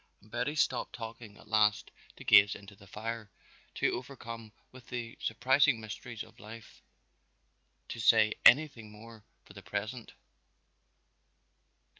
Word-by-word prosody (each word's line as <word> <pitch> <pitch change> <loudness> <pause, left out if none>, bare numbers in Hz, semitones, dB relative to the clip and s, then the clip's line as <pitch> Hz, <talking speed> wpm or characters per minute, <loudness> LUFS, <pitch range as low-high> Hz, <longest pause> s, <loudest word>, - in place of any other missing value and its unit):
And 105 - -22
Betty 125 +5 -2
stopped 130 -4 0
talking 115 -2 -9
at - - -17
last 105 -1 +2 0.2
to - - -12
gaze 100 +1 +6
into 100 0 -12
the 100 0 -18
fire, 110 +1 -6 0.5
too - - +1
overcome 115 -4 -7 0.2
with 130 -2 -15
the 120 -2 -6
surprising 130 +2 +3
mysteries 110 +1 -7
of 110 +1 -18
life 110 +1 -12 1.1
to - - -6
say 110 -1 +5
anything 125 -5 +5
more 110 +1 -14 0.2
for - - -15
the 100 - -11
present. 110 +4 -5
115 Hz, 130 wpm, -31 LUFS, 105-120 Hz, 1.1 s, gaze